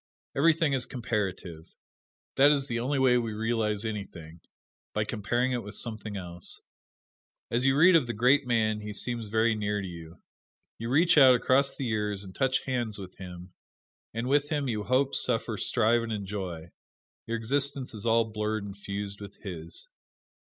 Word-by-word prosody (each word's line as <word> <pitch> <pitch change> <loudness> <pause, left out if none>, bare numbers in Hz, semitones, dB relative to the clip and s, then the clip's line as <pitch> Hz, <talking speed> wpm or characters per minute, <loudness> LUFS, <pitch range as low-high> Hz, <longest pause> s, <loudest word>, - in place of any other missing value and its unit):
Everything 160 0 +3
is 130 -3 0
comparative; 95 -9 -4 0.6
that 140 +2 +6
is 140 -2 +2
the 120 -2 -2
only 135 +4 -1
way 130 -2 +4
we 115 -2 -3
realize 110 -1 -1
anything 85 -7 -6 0.6
by 105 - +2
comparing 120 +4 -1
it 125 -1 -1
with 105 -1 -7
something 110 -3 -3
else. 85 -2 -6 0.9
As 125 +3 +1
you 135 +1 +3
read 180 +4 +7
of 150 -7 +4
the 120 - -2
great 125 +5 +3
man 110 -3 +1
he 105 0 -6
seems 115 +1 -2
very 110 +2 +2
near 105 -1 -1
to 95 - -4
you. 85 -1 -10 0.6
You 115 +1 -4
reach 160 +4 +5
out 130 -2 +8
across 135 +3 +2
the 135 - -3
years 105 -3 -1
and 95 -1 -10
touch 130 +2 +1
hands 120 -5 -2
with 95 -2 -9
him, 90 -1 -10 0.6
and 115 +2 -3
with 145 +2 +2
him 145 -3 -1
you 105 -4 -2
hope, 130 +2 +2
suffer, 115 -2 0
strive 115 +3 +2
and 115 -1 -4
enjoy: 95 -5 -5 0.6
your 115 0 -1
existence 135 +3 +1
is 105 -2 -6
all 115 0 +4
blurred 110 -1 -2
and 100 -1 -7
fused 100 0 -6
with 100 -1 -10
his. 85 -5 -5
110 Hz, 170 wpm, -28 LUFS, 100-130 Hz, 0.9 s, out